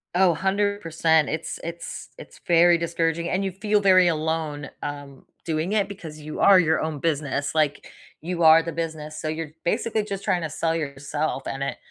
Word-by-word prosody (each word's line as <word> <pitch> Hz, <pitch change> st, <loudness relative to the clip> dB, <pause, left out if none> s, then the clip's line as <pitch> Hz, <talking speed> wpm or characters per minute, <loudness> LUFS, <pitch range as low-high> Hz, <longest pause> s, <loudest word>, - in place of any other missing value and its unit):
Oh, 180 Hz, -3 st, +4 dB
100%. 190 Hz, -5 st, +1 dB
It's 160 Hz, +1 st, -4 dB
it's 170 Hz, 0 st, -7 dB
it's -, -, -13 dB
very 170 Hz, 0 st, +5 dB
discouraging, 170 Hz, 0 st, -1 dB
and 190 Hz, +2 st, 0 dB
you 190 Hz, -, -2 dB
feel 210 Hz, +2 st, +1 dB
very 185 Hz, -2 st, +6 dB
alone, 155 Hz, -3 st, -2 dB
um, 145 Hz, -2 st, -7 dB, 0.2 s
doing 160 Hz, +3 st, -2 dB
it 205 Hz, -2 st, +1 dB
because 160 Hz, -6 st, -9 dB
you 150 Hz, +1 st, -7 dB
are 195 Hz, -2 st, +7 dB
your 160 Hz, -2 st, +2 dB
own 155 Hz, -2 st, -3 dB
business, 145 Hz, -2 st, -1 dB
like 150 Hz, -2 st, 0 dB, 0.3 s
you 170 Hz, 0 st, -2 dB
are 160 Hz, +1 st, +8 dB
the 165 Hz, -, -5 dB
business. 155 Hz, -2 st, -5 dB
So, 155 Hz, -, -4 dB
you're 155 Hz, -1 st, -4 dB
basically 220 Hz, +4 st, 0 dB
just 200 Hz, -2 st, -5 dB
trying 175 Hz, -2 st, 0 dB
to 155 Hz, -, -4 dB
sell 165 Hz, +1 st, -1 dB
yourself, 145 Hz, -1 st, -3 dB
and 135 Hz, 0 st, -3 dB
it -, -, -3 dB
165 Hz, 180 wpm, -24 LUFS, 155-180 Hz, 0.3 s, are